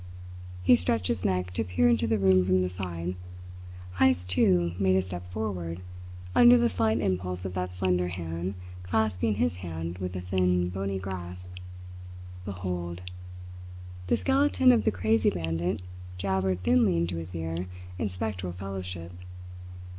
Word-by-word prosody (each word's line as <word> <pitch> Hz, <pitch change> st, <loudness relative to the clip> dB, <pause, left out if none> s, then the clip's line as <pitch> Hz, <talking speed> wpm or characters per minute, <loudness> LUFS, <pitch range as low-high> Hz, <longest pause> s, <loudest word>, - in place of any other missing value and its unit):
He 120 Hz, -, +7 dB
stretched 95 Hz, -1 st, 0 dB
his 105 Hz, -6 st, -1 dB
neck 90 Hz, -1 st, 0 dB
to 100 Hz, -, 0 dB
peer 95 Hz, +5 st, +2 dB
into 115 Hz, -1 st, +3 dB
the 110 Hz, 0 st, +2 dB
room 95 Hz, -2 st, +4 dB
from 95 Hz, 0 st, +3 dB
the 90 Hz, -, -2 dB
side. 90 Hz, -1 st, -4 dB, 0.9 s
Heyst, 90 Hz, +1 st, +3 dB
too, 90 Hz, -1 st, +3 dB
made 95 Hz, -1 st, +3 dB
a 95 Hz, -, +4 dB
step 90 Hz, -1 st, -7 dB
forward, 90 Hz, -5 st, -3 dB, 0.5 s
under 245 Hz, 0 st, +8 dB
the 235 Hz, -1 st, +2 dB
slight 110 Hz, 0 st, +1 dB
impulse 90 Hz, -2 st, -1 dB
of 95 Hz, -, -4 dB
that 90 Hz, -1 st, -2 dB
slender 90 Hz, -1 st, +1 dB
hand 85 Hz, +1 st, -4 dB, 0.3 s
clasping 105 Hz, +2 st, 0 dB
his 90 Hz, -2 st, 0 dB
hand 85 Hz, 0 st, -5 dB
with 90 Hz, 0 st, -4 dB
a 90 Hz, -, -3 dB
thin, 90 Hz, -1 st, +1 dB
bony 95 Hz, +1 st, -2 dB
grasp. 90 Hz, -1 st, -6 dB, 0.9 s
"Behold!" 90 Hz, -2 st, -4 dB, 1.0 s
the -, -, +3 dB
skeleton 270 Hz, -1 st, +4 dB
of 240 Hz, -, +3 dB
the -, -, +4 dB
crazy 110 Hz, +3 st, +2 dB
bandit 85 Hz, +2 st, -2 dB, 0.3 s
jabbered 95 Hz, -1 st, 0 dB
thinly 85 Hz, 0 st, +4 dB
into 85 Hz, +1 st, -1 dB
his 85 Hz, +2 st, -6 dB
ear 80 Hz, +2 st, -3 dB, 0.3 s
in 100 Hz, -, 0 dB
spectral 90 Hz, -2 st, -3 dB
fellowship. 90 Hz, -2 st, -6 dB
90 Hz, 145 wpm, -28 LUFS, 90-95 Hz, 1.0 s, under